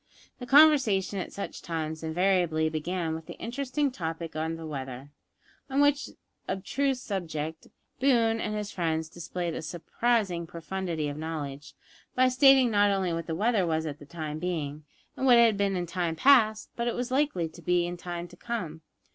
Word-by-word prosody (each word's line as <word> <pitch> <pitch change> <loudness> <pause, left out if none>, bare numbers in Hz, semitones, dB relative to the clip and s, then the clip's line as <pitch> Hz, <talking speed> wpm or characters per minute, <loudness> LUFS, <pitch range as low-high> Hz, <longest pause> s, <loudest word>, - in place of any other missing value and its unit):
The 245 - -7
conversation 265 -10 +5
at - - -5
such 200 - -6
times 160 -1 -4
invariably 165 -1 +1
began 160 +1 -2
with 160 0 -7
the - - -8
interesting 275 +3 -2
topic 165 -6 -5
of 160 +1 -2
the 165 - -8
weather, 135 -2 -6 0.6
on 270 +1 0
which 285 0 +3 0.4
abstruse 265 +7 -1
subject 160 -7 -4 0.3
Boone 230 -4 +3
and 210 0 -2
his 210 -1 -4
friends 160 -2 -1
displayed 175 0 -4
a - - -4
surprising 180 +1 -1
profundity 170 -2 -3
of 145 0 -5
knowledge, 150 -3 -6 0.4
by 255 0 +4
stating 260 -1 +6
not 205 -1 +4
only 190 -3 0
what 165 0 -4
the 160 - -2
weather 205 -1 +2
was 160 -1 0
at 150 -2 -5
the 145 - -13
time 155 -2 -5
being, 155 -4 -3 0.3
and 265 - -1
what 245 -2 +8
it 235 - +7
had 225 -2 +3
been 200 -1 0
in 175 -1 -1
time 170 -1 -2
past, 220 - +4
but 235 - -2
what 240 - 0
it - - -6
was 245 +1 -3
likely 265 - +1
to - - -14
be 175 -1 +2
in 175 0 -4
time 175 0 -6
to 175 - -14
come. 175 -8 -5
180 Hz, 185 wpm, -28 LUFS, 160-230 Hz, 0.6 s, what